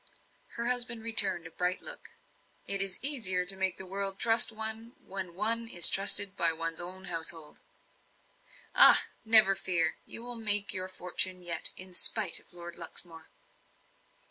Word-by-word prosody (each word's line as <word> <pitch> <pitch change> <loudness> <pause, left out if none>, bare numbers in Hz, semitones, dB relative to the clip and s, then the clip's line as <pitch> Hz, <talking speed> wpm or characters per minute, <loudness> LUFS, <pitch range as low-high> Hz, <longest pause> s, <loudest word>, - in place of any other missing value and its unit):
Her 235 - -6
husband 240 -2 -4
returned 205 -7 +5
a 165 - -13
bright 180 +2 -5
look. - - -11 0.6
"It 195 0 +1
is 195 -1 0
easier 205 -11 +3
to 190 +2 +2
make 190 -1 -4
the 190 - -10
world 195 +1 -8
trust 230 +1 +4
one, 220 +2 -6
when 185 -3 -9
one 230 +4 -1
is 175 -7 +8
trusted 200 0 +3
by 165 -4 +2
one's 165 +1 -5
own 185 +2 -11
household." 165 -3 -6 1.1
"Ah! - - +5 0.2
never 220 -3 +4
fear; 180 -3 -3
you 230 - -2
will 245 0 -7
make 205 -3 +3
your 185 0 -3
fortune 185 0 -6
yet, 170 -2 -4
in 185 0 -11
spite 180 +1 -2
of - - -19
Lord 175 -1 -12
Luxmore." 165 -2 -6
190 Hz, 155 wpm, -26 LUFS, 175-220 Hz, 1.1 s, is